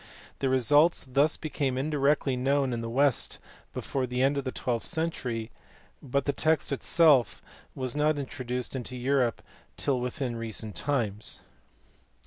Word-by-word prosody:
The 135 - +1
results 145 +7 +4
thus 140 +4 +3
became 140 -4 -2
indirectly 140 -1 +1
known 135 +1 +1
in 115 - -2
the 115 - -4
West 135 +1 +1 0.3
before 130 -2 -2
the 125 +1 0
end 140 +2 +3
of 140 -1 -2
the 130 - -2
twelfth 120 -3 -2
century, 125 -9 -2 0.5
but 140 0 -1
the 145 - +1
text 155 -2 +1
itself 140 -2 +4 0.4
was 130 -1 -3
not 150 0 +2
intro 135 -2 -5
duced 125 +1 -4
into 125 0 -5
Europe 125 -1 0 0.3
till 135 -3 0
within 125 0 -3
recent 110 -2 -5
times. 110 -8 -2
130 Hz, 145 wpm, -28 LUFS, 125-145 Hz, 0.5 s, results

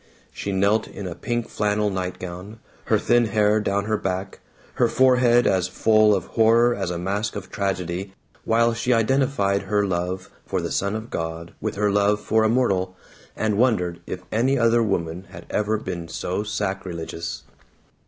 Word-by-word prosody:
She 100 - -4
knelt 100 +3 +2
in 100 - -8
a 90 - -4
pink 120 +4 -3
flannel 105 0 0
nightgown, 90 +2 -5 0.3
her - - +3
thin 120 0 +3
hair 105 0 +2
down 100 -1 -1
her 110 0 0
back, 95 0 -3 0.4
her 120 - +6
forehead 125 -1 +4
as 95 -2 +2
full 110 +2 +4
of 95 - -3
horror 115 +2 +4
as 95 -5 -3
a 90 - -3
mask 100 +5 -2
of 100 -2 -7
tragedy, 95 -1 -2 0.3
while 115 +1 +3
she 120 +2 +1
identified 115 -4 +2
her 105 +1 0
love 90 0 -3
for - - -2
the - - -4
Son 100 +2 0
of 110 +1 -6
God 80 0 -4
with - - -2
her 105 0 +1
love 105 +1 +2
for 110 +1 +1
a 110 - +3
mortal, 95 -7 +1 0.4
and 110 -1 0
wondered 90 -9 +1
if - - -5
any 130 +5 +2
other 115 -1 +3
woman 90 -4 -2
had - - -11
ever 105 +1 +1
been 85 -5 -5
so 90 +4 -3
sacrilegious. 90 -8 -4
100 Hz, 170 wpm, -23 LUFS, 95-110 Hz, 0.4 s, her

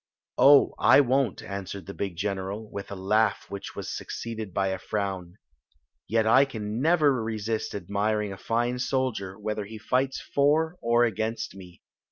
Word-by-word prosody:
"Oh, 140 0 +7
I - - +7
won't!" 135 -4 +1
answered 100 -1 -6
the 100 - -7
big 100 -3 -4
general, 100 +3 -3
with 100 - -6
a 100 - -5
laugh 105 +4 +1
which 100 0 -7
was - - -5
succeeded 110 -3 -6
by 95 +2 0
a 95 0 -3
frown. 95 -4 -3 0.4
" - - -50 0.3
Yet 110 0 +2
I 130 +5 +6
can 110 -4 -4
never 150 -6 +3
resist 110 0 -3
admiring 105 0 -1
a - - -9
fine 120 +2 -1
soldier, 125 -8 -1
whether 105 0 -3
he 110 +2 -9
fights 130 +5 0
for 155 +4 +1
or 120 +1 +3
against 110 0 -2
me. 90 -2 -13
110 Hz, 165 wpm, -27 LUFS, 100-120 Hz, 0.4 s, Oh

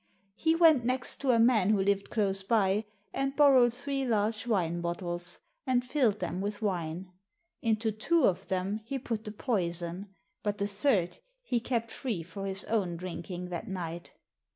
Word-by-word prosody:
He 320 +9 +1
went 320 -7 +6
next 255 +1 +1
to 275 - -2
a 240 - +5
man 225 -4 +4
who 210 -2 +3
lived 200 0 +1
close 195 -3 +1
by, 200 0 +2 0.3
and 275 0 -1
bor 285 -1 +6
rowed 245 -2 +6
three 275 +2 -2
large 220 -2 0
wine 175 -6 0
bottles 175 0 -3 0.3
and 250 -1 +2
filled 250 -6 +2
them 180 -1 -3
with 205 +1 -3
wine. 180 -3 -3 0.5
Into 220 -1 +1
two 295 +10 +1
of 180 - +1
them 190 +3 -1
he 270 +5 -3
put 230 -4 -4
the 210 - -4
poison, 180 -4 -2 0.3
but 205 -1 -2
the 200 - 0
third 200 -3 +1 0.2
he 245 - 0
kept 230 -1 -2
free 220 -11 -3
for 195 +3 -6
his 195 0 0
own 190 -7 0
drinking, 180 0 -6
that 175 -1 -5
night. 175 -2 -5
205 Hz, 175 wpm, -30 LUFS, 185-240 Hz, 0.5 s, went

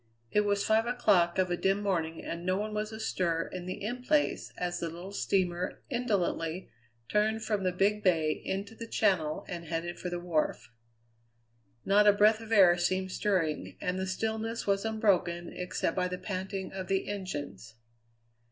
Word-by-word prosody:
It 210 0 +3
was 200 -1 +1
five 220 +1 +3
o'clock 200 -8 +3
of 185 -1 +2
a - - +2
dim 195 +3 +1
morning, 165 -5 -1
and 170 +1 -4
no 185 +1 +1
one 210 +1 -3
was 210 +1 -2
astir 185 -7 -1
in 180 -1 -5
the 185 - -5
In 245 +4 -3
Place 295 +3 +1
as 175 0 -2
the 170 - -2
little 175 +4 -8
steamer 185 -3 -1
indolently 190 -8 -1 0.4
turned 215 +1 +1
from 210 -3 -1
the 185 - +2
Big 200 +3 +1
Bay 165 -5 +3
into 195 +6 -4
the 230 0 -8
Channel 180 -9 +1
and 170 -1 -6
headed 165 +2 -3
for 180 - -3
the 175 0 -3
wharf. 170 -8 -1 1.1
Not 205 +1 +5
a 205 - +8
breath 215 +2 +4
of 225 0 -10
air 180 -5 +6
seemed 185 +2 0
stirring, 185 -7 -1
and 180 +1 -2
the 190 - -2
stillness 220 +4 -2
was 200 +1 +1
unbroken 185 -6 +1
except 180 -2 -2
by 180 -1 +1
the 180 0 -4
panting 190 0 -4
of 190 -1 -5
the 195 +1 0
engines. 145 - -5
190 Hz, 175 wpm, -30 LUFS, 175-210 Hz, 1.1 s, a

